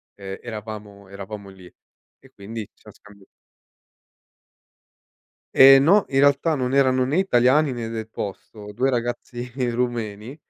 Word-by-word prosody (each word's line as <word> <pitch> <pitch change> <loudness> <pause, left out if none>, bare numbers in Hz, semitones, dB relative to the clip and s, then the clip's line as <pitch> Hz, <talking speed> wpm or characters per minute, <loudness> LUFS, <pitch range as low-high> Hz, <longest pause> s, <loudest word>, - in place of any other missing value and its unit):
ehm, 95 -1 -8
eravamo 105 -3 -9
eravamo 100 0 -9
lì. 95 -2 -15 0.5
E - - -20
quindi, 110 +3 -8
ci - - -31
siam - - -17
scambia 100 -1 -19 2.3
Ehm, 135 0 +8
no. 195 +7 +4
In 135 - +1
realtà 145 +3 +3
non 130 -2 -2
erano 130 -2 +3
né 145 +7 -1
italiani 135 -4 +3
né 120 -2 -5
del 110 -1 -6
posto, 105 0 -8
2 130 +5 0
ragazzi 120 0 -4 0.2
rumeni, 120 0 -4
120 Hz, 130 wpm, -22 LUFS, 105-130 Hz, 2.3 s, Ehm